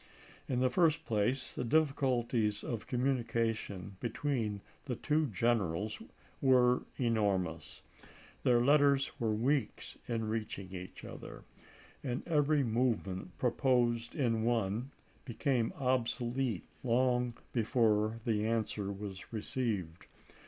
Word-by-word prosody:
In 125 -1 +1
the 130 - +4
first 160 -2 +3
place, 120 +4 0
the - - -3
difficulties 125 -6 +1
of 115 -3 -4
communication 115 -6 -1
between 115 -4 -2 0.2
the 130 -3 -2
two 150 +3 +1
generals 110 -3 0 0.4
were 125 -2 +4
enormous. 90 - 0 0.6
Their 120 -1 +4
letters 140 -1 +4
were 115 -3 +1
weeks 130 +2 -1
in 115 -2 -1
reaching 105 -4 -4
each 90 0 -8
other, - - -9 0.6
and 125 -2 -3
every 150 -2 +3
movement 115 -6 -1
proposed 120 -2 +1
in 115 -7 +1
one 115 +1 0 0.3
became 120 -1 0
obsolete 125 - 0 0.2
long 125 0 +2 0.2
before 115 -2 +2
the 110 -2 +1
answer 110 -3 -1
was 100 -1 -7
re 110 -2 -3
ceived. 105 - -3
120 Hz, 110 wpm, -33 LUFS, 105-130 Hz, 0.6 s, the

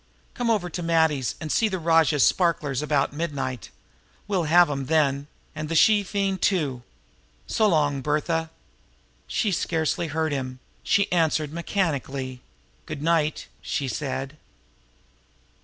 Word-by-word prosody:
Come 245 -2 -2
over 210 -6 +1
to 175 +1 -5
Matty's 160 -6 +1
and 155 -1 -5
see 225 - +3
the 190 -3 -2
rajah's 160 -4 +3
sparklers 150 -7 +1
about 145 -2 0
midnight. 135 - -4 0.6
We'll 190 -5 0
have 175 +3 +6
'em 135 -2 -3
then 145 -3 +1 0.3
and 155 -1 -5
the 165 - -1
she 210 +5 +5
fiend, 195 -1 -2
too. 145 -10 +1 0.6
So 220 - +2
long, 145 -6 +1
Bertha!" 155 +3 -1 0.8
She 215 - 0
scarcely 165 0 -1
heard 160 +1 -1
him; 130 -2 -3 0.2
she 200 0 +1
answered 160 -3 +1
mechanically. 140 -8 -2 0.5
"Good 140 - -6
night," 160 -2 +1 0.2
she 140 - -2
said. 135 +3 -4
155 Hz, 130 wpm, -25 LUFS, 140-170 Hz, 0.8 s, have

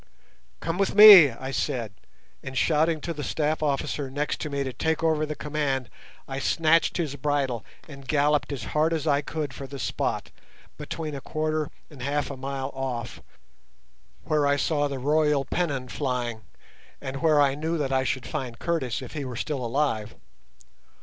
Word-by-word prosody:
"Come 170 +3 -2
with 195 - +1
me," 205 -8 +11
I 130 +3 -7
said, 115 -5 -2 0.5
and, 135 0 -6
shouting 160 +1 +2
to 170 - -3
the 145 -2 -6
staff 155 +1 -1
officer 140 -1 -1
next 145 +3 -2
to 150 - -3
me 140 -1 -1
to 130 -2 -4
take 160 +6 -1
over 155 -1 +2
the 150 - -4
command, 140 -6 -2 0.4
I 135 0 -4
snatched 165 +3 +2
his 155 -5 -2
bridle 135 -5 -1 0.2
and 140 -3 -12
galloped 150 0 +2
as 135 -5 -4
hard 155 +2 +2
as 160 -1 -2
I 145 -2 +3
could 150 -2 -4
for 135 +2 -7
the 140 - -8
spot, - - -2 0.4
between 155 -2 -5
a 140 - -5
quarter 155 0 -2 0.2
and 140 -4 -12
half 145 +2 -1
a - - -5
mile 135 +1 -4
off, 130 -4 -4 1.0
where 150 -2 +1
I 140 - +3
saw 145 0 +1
the 140 -1 -4
royal 150 +1 +2
pennon 140 -5 -2
flying, 120 -4 -3 0.5
and 135 +1 -6
where 155 -2 +4
I 140 -2 +4
knew 160 +4 -2
that 135 -3 -1
I 130 0 +2
should 130 -1 -2
find 130 -6 -4
Curtis 135 -7 -2
if 125 - -9
he 145 - -4
were 130 -2 -6
still 140 +1 -3
alive. 115 -4 -1
145 Hz, 175 wpm, -26 LUFS, 130-155 Hz, 1.0 s, me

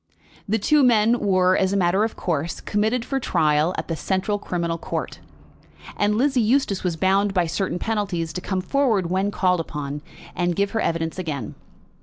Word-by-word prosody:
The 220 - +2
two 295 +8 +3
men 235 -2 +4
were, 185 -2 +3
as 190 0 +1
a - - +2
matter 190 +2 +2
of 225 - -2
course, 165 -1 -2
committed 220 +4 0
for 270 - -1
trial 155 - +1
at - - -4
the 165 - -2
Central 195 +4 -1
Criminal 170 -3 -2
Court, - - -4 0.8
and 205 +1 +1
Lizzie 265 0 +2
Eustace 225 -3 +1
was 180 -3 -1
bound 195 +4 +1
by 180 -2 +3
certain 175 +2 -2
penalties 195 -6 -2
to 180 - -4
come 190 0 -2
forward 215 -7 +1
when 190 +2 +1
called 180 -3 +1
upon, 150 -2 -5 0.3
and 175 -1 0
give 200 +2 0
her 220 - -1
evidence 165 +1 -2
again. 145 - -4
190 Hz, 180 wpm, -23 LUFS, 170-210 Hz, 0.8 s, men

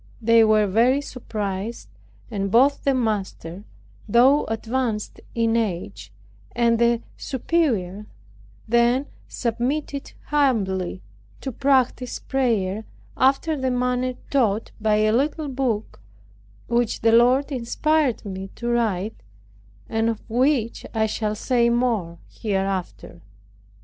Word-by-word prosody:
They 230 0 +5
were 215 -1 +4
very 235 +7 +3
surprised; 215 -5 -5 0.4
and 195 -2 -2
both 265 +7 +3
the 275 -1 +3
master, 205 -5 -3 0.4
though 260 +7 +5
advanced 225 -1 -3
in 230 -1 +2
age, 170 - -3 0.4
and 235 -1 +2
his 235 0 +3 0.2
superior 225 - -1 0.6
then 240 +4 +3 0.2
submitted 270 +4 -3
humbly 195 -11 0 0.4
to 265 - -4
practice 255 -1 +1
prayer, 220 -6 -1 0.3
after 275 +5 +2
the 260 -2 -1
manner 250 0 0 0.2
taught 225 -6 +1
by 215 -1 +3
a 215 0 +3
little 290 +5 0
book, 245 - -2 0.6
which 235 -1 0
the 225 - +4
Lord 250 +5 +4
inspired 275 +1 0
me 190 -1 -5
to 240 - -4
write, 220 -3 -1 0.7
and 225 +1 0
of 225 -2 -5
which 245 0 +1
I 220 0 +2
shall 215 0 -2
say 235 +1 +2
more 230 -9 0
hereafter. 190 - -3
230 Hz, 110 wpm, -23 LUFS, 210-255 Hz, 0.7 s, They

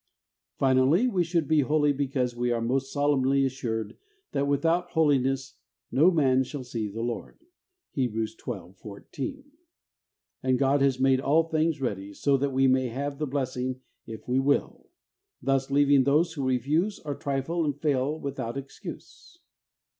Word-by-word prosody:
Finally, 135 - +3
we 190 -8 +1
should 170 -3 0
be 155 -1 +3
holy 145 +1 +2
because 130 -3 -1
we 120 0 -1
are 120 -1 +1
most 135 +4 -1
solemnly 140 -1 +2
assured 115 -5 -3 0.3
that 140 0 0
without 165 +5 +1
Holiness 135 -4 +1 0.2
' 120 - -65
no 155 +7 +5
man 135 -7 +3
shall 135 +1 -6
see 115 -3 -4
the 110 +3 -5
Lord 120 -1 -5 0.3
' 370 -1 -50
(Heb. 125 -5 -1
xii. 110 -4 -5
14), 275 - -7 0.9
and 130 -1 +2
God 140 +1 +2
has 135 -2 +2
made 130 0 +3
all 155 +4 +3
things 160 -1 0
ready, 100 -5 -3
so 140 +5 +2
that 140 +1 0
we 135 0 +2
may 130 0 +3
have 140 +4 -4
the 150 - -1
blessing 130 -1 -3 0.3
if 110 -1 -9
we 125 +1 +2
will, 140 +1 0 0.5
thus 135 0 0
leaving 140 -1 +4
those 155 +5 +2
who 140 -4 -2
refuse 150 - +1
or 145 - -2
trifle 140 +5 -2
and 145 -2 -2
fail 145 0 0
without 135 -4 -4
excuse. 135 - -10
135 Hz, 160 wpm, -27 LUFS, 130-150 Hz, 0.9 s, no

